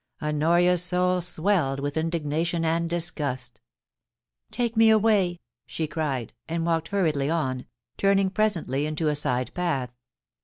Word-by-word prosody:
Honoria's 170 Hz, +4 st, +2 dB
soul 180 Hz, +1 st, +1 dB
swelled 165 Hz, -5 st, 0 dB
with 145 Hz, +1 st, -3 dB
indignation 165 Hz, +1 st, -1 dB
and 165 Hz, +1 st, 0 dB
disgust 155 Hz, -7 st, -2 dB, 0.5 s
* -, -, -52 dB
Take 235 Hz, -1 st, 0 dB
me 225 Hz, 0 st, +6 dB
away 205 Hz, -5 st, +3 dB
!' -, -, -67 dB
she 160 Hz, -, -3 dB
cried, 150 Hz, -6 st, -3 dB, 0.2 s
and 165 Hz, 0 st, -1 dB
walked 165 Hz, -1 st, 0 dB
hurriedly 155 Hz, -8 st, 0 dB
on, 130 Hz, -6 st, -1 dB, 0.3 s
turning 195 Hz, -1 st, +2 dB
presently 170 Hz, -10 st, 0 dB
into 155 Hz, 0 st, -1 dB
a 150 Hz, -, 0 dB
side 125 Hz, -3 st, -1 dB
path. 160 Hz, -9 st, -1 dB
165 Hz, 140 wpm, -25 LUFS, 150-180 Hz, 0.5 s, me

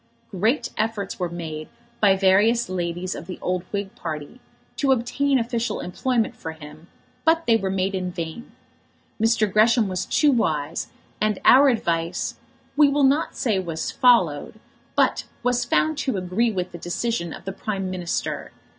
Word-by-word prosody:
Great 230 Hz, +7 st, 0 dB
efforts 215 Hz, -3 st, -2 dB
were 180 Hz, -1 st, -1 dB
made 160 Hz, -3 st, -6 dB, 0.3 s
by 200 Hz, -2 st, +5 dB
various 205 Hz, +5 st, +3 dB
ladies 180 Hz, 0 st, -3 dB
of -, -, -8 dB
the 185 Hz, -, -6 dB
old 180 Hz, 0 st, -1 dB
Whig 200 Hz, -1 st, -3 dB
party 155 Hz, -, -6 dB, 0.4 s
to 275 Hz, -2 st, +2 dB
obtain 265 Hz, +3 st, +1 dB
official 235 Hz, -2 st, -1 dB
employment 230 Hz, +5 st, -1 dB
for 160 Hz, -, -6 dB
him, 155 Hz, +1 st, -13 dB, 0.4 s
but 325 Hz, +1 st, +3 dB
they 230 Hz, -, +4 dB
were 195 Hz, -4 st, 0 dB
made 190 Hz, +1 st, 0 dB
in 185 Hz, -1 st, -2 dB
vain. 170 Hz, +6 st, -6 dB, 0.7 s
Mr. 225 Hz, -1 st, +3 dB
Gresham 225 Hz, +1 st, +4 dB
was 185 Hz, -1 st, -3 dB
too 300 Hz, -2 st, +3 dB
wise, 160 Hz, -, 0 dB, 0.3 s
and 215 Hz, -2 st, +1 dB
our 275 Hz, +2 st, +8 dB
advice, 170 Hz, -8 st, -1 dB, 0.4 s
we 295 Hz, -1 st, +6 dB
will 285 Hz, 0 st, +2 dB
not 280 Hz, +4 st, +2 dB
say 220 Hz, -8 st, 0 dB
was 165 Hz, -3 st, -3 dB
followed, 220 Hz, -, +3 dB, 0.4 s
but -, -, +2 dB, 0.2 s
was 245 Hz, 0 st, +1 dB
found 310 Hz, +5 st, +1 dB
to 265 Hz, -7 st, -1 dB
agree 190 Hz, +6 st, 0 dB
with 185 Hz, -3 st, -3 dB
the 170 Hz, -, -9 dB
decision 175 Hz, 0 st, -2 dB
of -, -, -10 dB
the 195 Hz, -, -4 dB
Prime 195 Hz, -2 st, -3 dB
Minister. 180 Hz, -2 st, -3 dB
200 Hz, 160 wpm, -23 LUFS, 175-240 Hz, 0.7 s, our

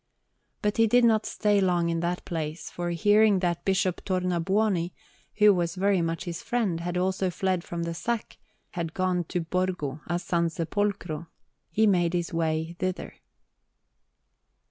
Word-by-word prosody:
But 210 Hz, 0 st, 0 dB
he 225 Hz, 0 st, +5 dB
did 245 Hz, +3 st, +4 dB
not 220 Hz, -2 st, +3 dB
stay 205 Hz, -2 st, +2 dB
long 175 Hz, -2 st, +2 dB
in 165 Hz, 0 st, 0 dB
that 175 Hz, +1 st, -2 dB
place, 160 Hz, -1 st, -4 dB
for, 175 Hz, 0 st, -3 dB
hearing 205 Hz, +3 st, +4 dB
that 175 Hz, -2 st, -1 dB
Bishop 190 Hz, -2 st, 0 dB
Tornabuoni, 185 Hz, 0 st, 0 dB, 0.4 s
who 210 Hz, -1 st, +6 dB
was 175 Hz, -2 st, -1 dB
very 195 Hz, -1 st, +2 dB
much 165 Hz, +1 st, -2 dB
his 175 Hz, -3 st, -5 dB
friend, 235 Hz, -5 st, 0 dB
and 165 Hz, -, -3 dB
had 175 Hz, +1 st, -3 dB
also 185 Hz, +1 st, 0 dB
fled 185 Hz, 0 st, -1 dB
from 170 Hz, -1 st, -4 dB
the 170 Hz, 0 st, -3 dB
sack, 215 Hz, +7 st, -3 dB, 0.3 s
had 165 Hz, -2 st, -4 dB
gone 185 Hz, -2 st, 0 dB
to 175 Hz, -, -2 dB
Borgo 165 Hz, -4 st, -2 dB
a 175 Hz, -, 0 dB
San 170 Hz, -1 st, 0 dB
Sepolcro, 170 Hz, -1 st, -2 dB, 0.4 s
he 220 Hz, -, +2 dB
made 180 Hz, -4 st, +3 dB
his 175 Hz, 0 st, -2 dB
way 160 Hz, 0 st, -1 dB
thither. 185 Hz, 0 st, -3 dB
180 Hz, 160 wpm, -27 LUFS, 170-195 Hz, 0.4 s, who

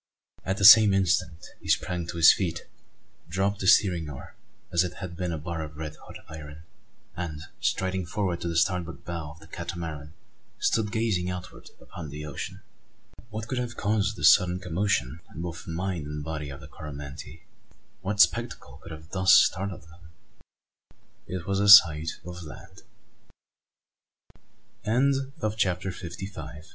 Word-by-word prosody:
At 95 Hz, +1 st, -2 dB
the 100 Hz, -, +2 dB
same 105 Hz, -1 st, +10 dB
instant 90 Hz, -2 st, 0 dB
he -, -, -13 dB
sprang 90 Hz, -2 st, 0 dB
to 85 Hz, 0 st, -6 dB
his 85 Hz, 0 st, +8 dB
feet, 85 Hz, -4 st, -3 dB, 0.6 s
dropped 95 Hz, +3 st, 0 dB
the 95 Hz, -, -2 dB
steering 90 Hz, -6 st, +4 dB
oar, 65 Hz, -, -10 dB, 0.4 s
as 85 Hz, +1 st, +3 dB
if 90 Hz, -1 st, -4 dB
it -, -, -17 dB
had 95 Hz, -3 st, -7 dB
been 90 Hz, 0 st, -3 dB
a 80 Hz, -, -3 dB
bar 80 Hz, +1 st, -5 dB
of 75 Hz, -1 st, -8 dB
red 75 Hz, -1 st, -6 dB
hot -, -, -14 dB
iron; 75 Hz, -1 st, -10 dB, 0.5 s
and, 80 Hz, -4 st, -5 dB, 0.2 s
striding 95 Hz, -1 st, -1 dB
forward 90 Hz, -2 st, -2 dB
to -, -, -3 dB
the 85 Hz, -1 st, -1 dB
starboard 85 Hz, -1 st, -1 dB
bow 85 Hz, -3 st, -5 dB
of 80 Hz, -, -19 dB
the 80 Hz, -, -15 dB
Catamaran 80 Hz, -3 st, -6 dB, 0.4 s
stood 110 Hz, -2 st, 0 dB
gazing 105 Hz, -6 st, 0 dB
outward 90 Hz, -1 st, -8 dB
upon 80 Hz, -5 st, -9 dB
the 75 Hz, +2 st, -7 dB
ocean! 95 Hz, +7 st, -7 dB, 0.7 s
What 110 Hz, 0 st, -6 dB
could 130 Hz, 0 st, -2 dB
have 120 Hz, -1 st, -4 dB
caused 105 Hz, 0 st, 0 dB
this -, -, +8 dB
sudden 90 Hz, -2 st, +1 dB
commotion 90 Hz, -5 st, -1 dB, 0.2 s
in 80 Hz, -, -5 dB
both 85 Hz, -1 st, -6 dB
the -, -, -6 dB
mind 85 Hz, -3 st, -3 dB
and 75 Hz, 0 st, -5 dB
body 75 Hz, -2 st, -5 dB
of 70 Hz, -, -9 dB
the -, -, -11 dB
Coromantee? 70 Hz, -2 st, -9 dB, 0.6 s
What 100 Hz, +1 st, -3 dB
spectacle 65 Hz, -7 st, +2 dB
could 85 Hz, -, -11 dB
have 80 Hz, +1 st, -11 dB
thus 95 Hz, -1 st, +3 dB
startled 95 Hz, -1 st, +3 dB
him? 80 Hz, +2 st, -18 dB, 1.3 s
It 90 Hz, -2 st, -5 dB
was 100 Hz, 0 st, -1 dB
the 100 Hz, 0 st, +2 dB
sight 80 Hz, -6 st, +8 dB
of 90 Hz, 0 st, -8 dB
land! 95 Hz, +4 st, -12 dB, 2.8 s
CHAPTER 95 Hz, -2 st, 0 dB
FIFTY 90 Hz, +1 st, -7 dB
SIX. 80 Hz, -4 st, -10 dB
85 Hz, 160 wpm, -27 LUFS, 80-95 Hz, 2.8 s, same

